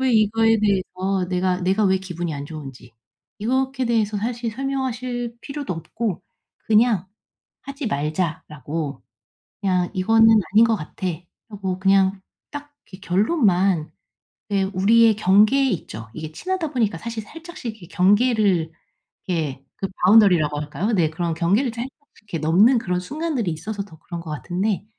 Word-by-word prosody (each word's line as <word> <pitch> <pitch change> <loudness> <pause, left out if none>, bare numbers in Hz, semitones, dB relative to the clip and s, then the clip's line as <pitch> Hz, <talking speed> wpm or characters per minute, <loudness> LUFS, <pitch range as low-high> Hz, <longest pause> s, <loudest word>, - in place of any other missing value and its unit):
왜 260 -2 +2
이거에 225 +1 +3
대해서 190 -2 0
내가 180 0 0
내가 195 +4 +2
왜 190 0 +3
기분이 175 -4 -5
안 140 0 -5
좋은지 135 -6 -9 0.5
이것에 260 +3 0
대해서 220 -3 +1
사실 235 +2 -3
설명하실 250 -2 -3
필요도 280 -8 -5
없고 190 +3 -4 0.5
그냥 215 -4 +3 0.6
"하지 275 -2 -5
말자."라고 150 -2 -3 0.6
그냥 180 -2 +1
"이거는 225 +4 +5 0.2
아닌 220 +2 +7
것 225 -1 +2
같아." 185 +2 -6 0.4
하고 195 -3 -4
그냥 195 0 +3 0.3
딱 290 0 -9 0.2
이렇게 185 - -11
결론만 190 - +2 0.6
예 200 -1 +2
우리의 210 +4 +4
경계에 210 +7 +4
있죠. 115 - -5
이게 155 +2 -7
친하다 345 - -3
보니까 215 -9 0
사실 230 -2 -5
살짝씩 320 -4 -8
이렇게 170 - -11
경계를 200 -3 +2 0.6
예 150 -6 -2 0.2
그 195 - 0 0.2
바운더리라고 180 -8 +5
할까요 170 +9 -2
네. 175 -7 +3
그런 170 +1 -2
경계를 200 +11 +1
살짝씩 240 +2 -4 0.4
이렇게 - - -1
넘는 180 - +4
그런 180 -5 -2
순간들이 280 - -2
있어서 200 +6 -5
더 160 -6 -16
그런 170 -2 -7
것 165 - -10
같은데 180 +7 -2
195 Hz, 320 characters per minute, -22 LUFS, 175-230 Hz, 0.6 s, 아닌